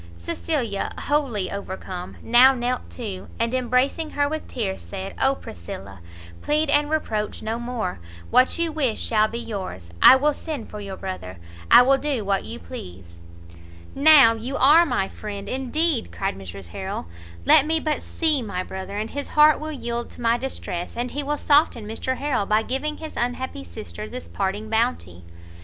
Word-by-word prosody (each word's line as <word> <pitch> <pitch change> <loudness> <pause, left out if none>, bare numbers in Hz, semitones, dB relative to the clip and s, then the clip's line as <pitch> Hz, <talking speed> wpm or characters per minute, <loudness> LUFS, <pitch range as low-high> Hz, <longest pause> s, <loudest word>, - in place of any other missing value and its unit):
Cecilia, 225 - -2
wholly 260 -10 -1
overcome, 190 -2 -6
now 255 +3 +6
knelt 245 0 -2
too, 205 -7 -6
and 230 +1 0
embracing 255 +5 +1
her 285 0 +3
with 310 +1 -4
tears, 200 -6 -3
said 195 -1 -7
"Oh 270 +1 +4
Priscilla, 95 - -9 0.4
plead 300 0 +1
and 290 0 +3
reproach 220 -9 -2
no 220 +2 -2
more! 240 - -3 0.3
what 255 +1 +4
you 335 -1 0
wish 275 -8 0
shall 215 -1 +2
be 230 - -6
yours, 190 - -6
I - - +10
will 295 +3 +2
send 295 -6 -6
for 210 - -7
your 195 -2 -7
brother, 140 - -6 0.3
I - - +9
will 270 +2 +4
do 275 -8 -2
what 195 -1 0
you - - -6
please!" 85 +1 -10 0.7
"Now 280 -5 +7
you 245 +5 -4
are 315 +6 +6
my 190 - 0
friend 200 -1 -7
indeed!" 265 +3 0
cried 195 0 -2
Mrs 95 -1 -9
Harrel, 85 - -5 0.4
"let 280 - +6
me 320 0 +2
but 305 -2 -1
see 310 -5 +1
my 200 -5 -3
brother, 190 +2 -6
and 215 +2 -3
his 285 0 -4
heart 300 0 +5
will 310 0 -5
yield 235 -4 -4
to - - -13
my 230 0 +3
distress, 235 -8 -5
and 245 +1 -2
he 290 - -2
will 295 +1 -2
soften 290 -8 +3
Mr 225 +4 -3
Harrel 265 -8 -1
by 215 +1 +3
giving 290 +6 -2
his 315 -1 -8
unhappy 245 - -3
sister 85 +3 -8
this 85 - -7
parting 190 - -3
bounty." 220 - -1
235 Hz, 175 wpm, -23 LUFS, 195-280 Hz, 0.7 s, I